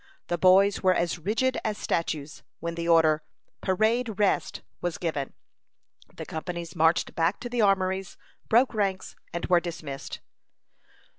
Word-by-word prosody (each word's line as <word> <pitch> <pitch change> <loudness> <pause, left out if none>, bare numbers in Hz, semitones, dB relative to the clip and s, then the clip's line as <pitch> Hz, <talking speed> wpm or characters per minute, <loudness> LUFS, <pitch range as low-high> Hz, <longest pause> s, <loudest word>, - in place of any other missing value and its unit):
The 175 - 0
boys 195 +3 +5
were 185 -1 +4
as 170 0 -1
rigid 225 +9 0
as 215 -1 -2
statues 155 -3 -3 0.2
when 170 +1 -4
the 170 0 -4
order, 160 -2 +4 0.4
"Parade 220 +3 +1
rest," 205 -2 0 0.2
was 175 -2 -2
given. 155 -6 -3 0.8
The - - -7
companies 170 0 -6
marched 165 +1 +2
back 165 +4 +1
to 245 - -5
the 240 -1 0
armories, 190 -2 +1 0.3
broke 245 +3 +4
ranks, 195 -3 -2 0.2
and 170 - -3
were 180 -1 +4
dismissed. 155 -5 -6
180 Hz, 140 wpm, -27 LUFS, 165-205 Hz, 0.8 s, boys